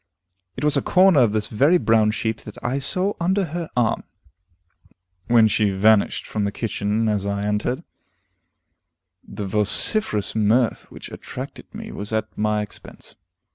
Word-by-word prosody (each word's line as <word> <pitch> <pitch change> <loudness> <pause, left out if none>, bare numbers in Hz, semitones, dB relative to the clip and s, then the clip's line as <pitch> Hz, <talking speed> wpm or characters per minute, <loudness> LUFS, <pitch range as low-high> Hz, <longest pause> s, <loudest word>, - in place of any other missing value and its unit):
It 130 - -5
was 150 0 +3
a 140 - +2
corner 185 -4 +5
of 120 -4 +4
this 105 0 0
very 140 +12 +3
brown 110 -8 +3
sheet 110 0 -2
that 105 - -10
I 130 +3 -1
saw 185 +8 0
under 190 +3 +1
her 170 -2 -4
arm, 115 -1 +2 1.3
when 115 -2 +5
she 105 -1 +2
vanished 100 +2 +3
from 105 - -3
the 100 - -1
kitchen 110 0 -1
as 105 -2 0
I 100 0 -2
entered; 105 +5 -1 1.4
the 105 - -7
vociferous 105 - 0
mirth 110 +2 +1
which - - -10
attracted - - -8
me - - -8
was 105 +2 -7
at 110 0 -2
my 105 0 0
expense. 105 - -9
110 Hz, 150 wpm, -22 LUFS, 105-135 Hz, 1.4 s, corner